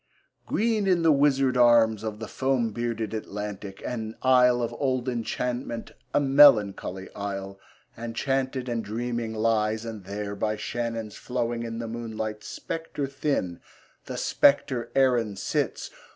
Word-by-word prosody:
Green 220 -2 +1
in 180 -3 +3
the 165 - +6
wizard 135 -2 +3
arms 115 -3 +5
Of 110 -1 -4
the 110 0 -6
foam 130 -4 0
bearded 115 -1 -3
Atlantic, 105 -2 -6
An 110 -2 -4
isle 125 -1 +5
of 115 - -2
old 130 -2 0
enchantment, 120 0 -3 0.2
A - - +3
melancholy 115 -9 +4
isle, 100 -1 -5 0.4
Enchanted 130 +3 -2
and 115 -2 -2
dreaming 115 +1 -3
lies; 110 0 +1
And 110 -4 -7
there, 100 +1 -4
by 105 +1 -1
Shannon's 115 0 -4
flowing 120 -2 -2
In 115 -1 -5
the 115 0 -4
moonlight, 110 -2 -5
spectre 165 -3 -4
thin, 135 - -2 0.5
The - - -6
spectre 130 -4 +2
Erin 120 -6 +3
sits. - - -2
115 Hz, 135 wpm, -26 LUFS, 110-130 Hz, 0.5 s, the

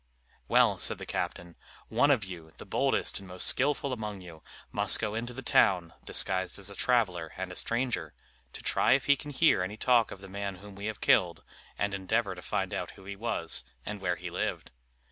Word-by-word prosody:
"Well," - - +4
said - - +3
the - - -7
captain, 85 -1 -4 0.3
"one 140 - +3
of 130 -7 +3
you, 85 -4 -9
the - - -10
boldest - - 0
and 95 - -12
most 90 0 -1
skilful 140 0 +2
among 105 -4 -5
you, 85 -3 -12 0.3
must 100 -1 +3
go 105 -2 -2
into 115 +2 -3
the 130 +2 -8
town, 90 -7 +3
disguised 95 -1 +2
as 100 0 -4
a - - -9
traveller 95 -11 +1
and 95 0 -4
a - - -8
stranger, 120 +5 -1 0.4
to - - -9
try - - +3
if 135 - +2
he 140 - +5
can 145 +2 -9
hear 145 - +3
any 100 +4 -4
talk 120 -1 +3
of 95 - -9
the 95 - -10
man 100 0 -4
whom 100 +2 -12
we 100 +2 -6
have 110 - -5
killed, 85 -2 +3 0.3
and 100 -1 -1
endeavor 100 +1 0
to 90 - -10
find - - -2
out - - -3
who 95 - -14
he 100 0 -6
was, 100 -6 -1 0.2
and 105 -2 -5
where 90 -2 0
he - - -7
lived. - - -3
100 Hz, 210 wpm, -30 LUFS, 90-115 Hz, 0.4 s, he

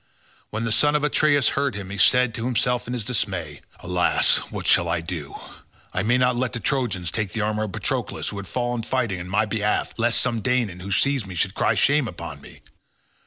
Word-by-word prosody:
When 110 +2 -3
the 115 - -1
son 145 +7 +4
of 150 - +1
Atreus 150 -2 +3
heard 140 -4 -1
him, 100 -2 -6
he 100 - -5
said 125 +2 +5
to 115 0 -4
himself 125 -1 0
in 125 - -4
his 120 -4 -4
dismay, 95 - -3 0.2
"Alas! 90 -1 +2
what - - -5
shall 85 - +4
I 85 0 0
do? 80 -4 -6 0.6
I 95 - 0
may 115 +5 +2
not 125 0 +2
let 125 0 -1
the 115 - -2
Trojans 110 - -1
take 105 -3 -2
the 110 - -1
armour 110 +1 0
of 105 - -6
Patroclus - - -2
who 100 - -7
has 100 - -8
fallen 120 0 -2
fighting 115 -5 -1
on 90 +1 -7
my 105 +3 +2
behalf, 105 -1 -1
lest 115 0 +2
some 115 -3 0
Danaan 120 -7 0
who 100 +2 -6
sees 135 +2 +1
me 95 - -8
should 95 +3 0
cry - - +1
shame 145 -3 +3
upon 85 -7 -8
me. - - -14
110 Hz, 215 wpm, -23 LUFS, 95-125 Hz, 0.6 s, said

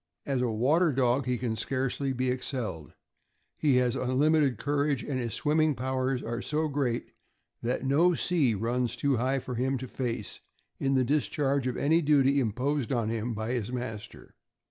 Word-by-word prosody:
As 135 -3 0
a 125 - +1
water 145 +10 +3
dog 130 0 +1
he 125 -1 +1
can 120 -2 -2
scarcely 135 +3 -1
be 130 0 0
excelled; 125 - -4 0.7
he 145 -4 +3
has 125 -1 +2
unlimited 140 0 +2
courage, 145 0 0
and 135 -3 -2
his 115 -3 -3
swimming 155 0 +2
powers 130 0 -1
are 115 +1 -3
so 155 +3 -1
great 140 -5 -2 0.5
that 125 +3 -2
no 165 +6 +4
sea 150 -12 +2
runs 120 +3 -1
too 140 +1 +1
high 130 +3 +1
for 125 -1 -5
him 130 +3 0
to 130 +1 -6
face 120 -4 -3 0.4
in 135 0 +1
the 130 - +3
discharge 140 -1 0
of 125 - -2
any 160 +4 +3
duty 140 -2 +4
imposed 130 +3 -1
on 115 -4 0
him 115 +1 -2
by 110 +2 -3
his 120 -3 -2
master. 115 -4 -6
130 Hz, 170 wpm, -28 LUFS, 120-140 Hz, 0.7 s, no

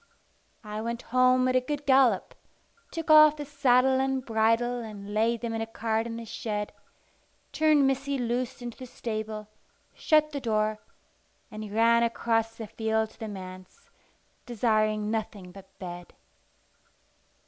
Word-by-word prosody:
I 210 0 -5
went 235 +1 -4
home 255 0 +4
at 255 - +1
a 255 - +4
good 290 +2 -4
gallop, 260 -7 +3 0.6
took 330 -2 -2
off 305 -1 +8
the 295 -1 -6
saddle 265 -2 +3
and 265 -1 -1
bridle 230 +2 +1
and 205 -3 -8
laid 225 +2 +1
them 235 -1 -3
in 225 - -2
a 225 - -3
cart 225 0 -2
in 230 - -5
the 230 - -7
shed, 210 -1 -4 0.8
turned 300 -1 +3
Missy 275 +1 0
loose 245 0 -2
into 240 -1 -7
the 255 - -8
stable, 215 -3 -5 0.5
shut 305 -1 +2
the 285 -2 -4
door, 215 -2 0 0.7
and 215 -1 -7
ran 230 +2 +4
across 225 -1 0
the 225 - -7
field 220 0 -1
to - - -23
the 220 - -5
manse, 185 -2 -10 0.6
desiring 215 -2 +1
nothing 210 -4 -4
but 190 0 -15
bed. 175 -1 -9
230 Hz, 150 wpm, -27 LUFS, 215-255 Hz, 0.8 s, off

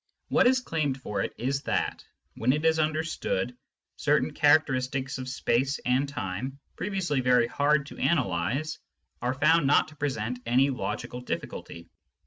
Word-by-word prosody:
What - - +4
is 255 0 +3
claimed 150 - -1
for 105 -6 -3
it - - -2
is 135 +3 -1
that, - - -1 0.3
when 125 +3 +1
it 150 +2 -1
is 160 0 +3
understood, 155 - -1 0.4
certain 150 0 +1
characteristics 135 -3 +2
of 130 0 -5
space 130 +2 0
and 130 +3 +2
time, 130 +2 -4 0.2
previously 185 -9 -1
very 125 -1 +4
hard 145 +3 +2
to - - -11
analyse, 130 - 0 0.4
are 125 +2 0
found 160 +2 +4
not 145 - +4
to 155 - -16
present 125 -5 -2
any 130 +4 +3
logical 125 -1 -4
difficulty. 85 -8 -6
135 Hz, 145 wpm, -27 LUFS, 125-150 Hz, 0.4 s, What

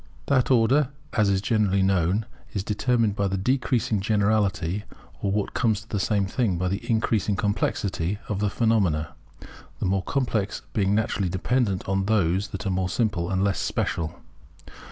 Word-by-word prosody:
That 130 -3 +2
order, 130 +3 +4 0.2
as 105 -3 +3
is 95 0 +1
generally 100 -3 +2
known, 95 +2 +2 0.3
is 100 - -2
determined 110 0 +1
by 100 -2 0
the 95 0 -1
decreasing 120 0 +1
generality, 100 -2 +1 0.4
or 100 - 0
what 100 0 -1
comes 110 -4 +1
to 105 - -17
the 105 - -2
same 100 0 +1
thing, 100 -2 0
by 90 +1 0
the 100 +2 -4
increasing 110 -3 +1
complexity 100 -2 -1
of 100 -2 -2
the 105 0 +1
phenomena; 100 -10 +1 0.7
the - - -3
more 95 +1 +1
complex 110 -3 -1
being 100 -1 +2
naturally 105 -3 0
dependent 100 +1 0
upon 95 0 0
those 100 -2 +2
that 105 - -6
are 100 - 0
more 95 0 0
simple 95 -7 0
and 95 0 +1
less 100 -3 +1
special. 80 +1 -2
100 Hz, 165 wpm, -25 LUFS, 95-110 Hz, 0.7 s, order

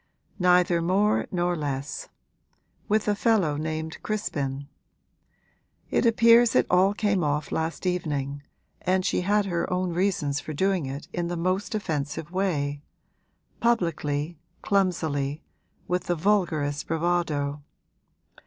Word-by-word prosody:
'Neither 180 -1 +4
more 195 +5 +2
nor 175 -1 0
less; 145 -2 -4 0.8
with 215 0 +2
a 210 - +3
fellow 205 -8 +2
named 160 +1 -4
Crispin. 140 -10 -3 1.2
It - - +3
appears 230 +1 +5
it - - +5
all 190 +3 +4
came 205 -4 +1
off 150 0 -1
last 160 +3 -2
evening, 145 -6 -2 0.4
and 185 0 +1
she - - +1
had 205 +2 +2
her 175 -3 -2
own 180 -1 0
reasons 170 -6 0
for 155 - -6
doing 190 -1 +1
it 140 +2 -6
in 175 -1 -1
the 175 0 -3
most 185 +5 -1
offensive 155 -5 -3
way 145 -7 -1 0.8
publicly, 165 -8 0 0.2
clumsily, 160 -7 0 0.4
with 180 0 -1
the 175 - 0
vulgarest 160 -6 0
bravado. 160 -4 0
175 Hz, 120 wpm, -26 LUFS, 145-190 Hz, 1.2 s, appears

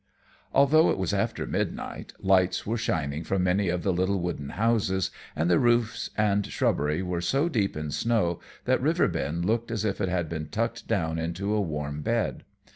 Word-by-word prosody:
Although 145 +4 +5
it - - +1
was 95 -3 -1
after - - -1
midnight, - - -3
lights 95 -1 +2
were 110 - -1
shining 80 -9 -1
from 95 +2 0
many 90 +1 +2
of 85 0 -1
the 95 - +1
little 95 +2 +1
wooden 85 -5 -3
houses, 105 -4 +1 0.2
and 80 +2 +1
the 85 -1 +4
roofs 120 -2 +2
and 105 -1 +2
shrubbery 75 +5 0
were 90 -1 -2
so 135 - +1
deep 105 - 0
in 75 -1 -4
snow 110 -5 +1 0.3
that - - +2
Riverbend 85 +4 +1
looked 115 +3 0
as 110 -2 -2
if 100 -1 -1
it 95 - +1
had 90 -2 0
been 80 -1 -5
tucked - - -2
down 80 0 0
into 90 +5 -2
a 105 - +2
warm 75 -4 -3
bed. - - -1
95 Hz, 185 wpm, -27 LUFS, 80-105 Hz, 0.3 s, Although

